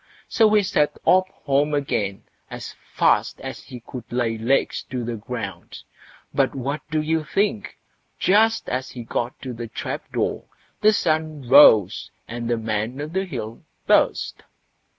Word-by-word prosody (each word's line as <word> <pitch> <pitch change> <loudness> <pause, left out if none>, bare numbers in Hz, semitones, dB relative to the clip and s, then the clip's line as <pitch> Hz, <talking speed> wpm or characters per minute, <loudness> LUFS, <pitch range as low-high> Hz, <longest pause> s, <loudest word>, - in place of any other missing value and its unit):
So 220 -3 +4
he 210 - +4
set 150 -5 +1
off 185 0 +5
home 145 +2 0
again 105 -9 -2 0.3
as - - -7 0.2
fast - - +2
as - - -7
he 125 -2 -10
could 120 -1 -10
lay 120 -2 0
legs 120 +5 +1
to 125 -2 -3
the 120 - -3
ground; 110 -2 -7 0.5
but - - +1
what 140 +3 -3
do 155 0 0
you 160 0 0
think, 195 - -1 0.4
just 225 +3 +3
as 130 +1 -3
he 120 - -8
got 120 +2 -3
to 130 -2 -5
the 115 0 -6
trap 115 - -6
door, - - -2 0.4
the 215 - +6
sun 155 - -1
rose 115 -8 +6 0.2
and 120 0 -5
the 120 - +1
Man 110 +3 -2
o' 145 - -3
the 190 +5 -2
Hill 115 - -6 0.2
burst. - - +2
130 Hz, 155 wpm, -23 LUFS, 115-155 Hz, 0.5 s, the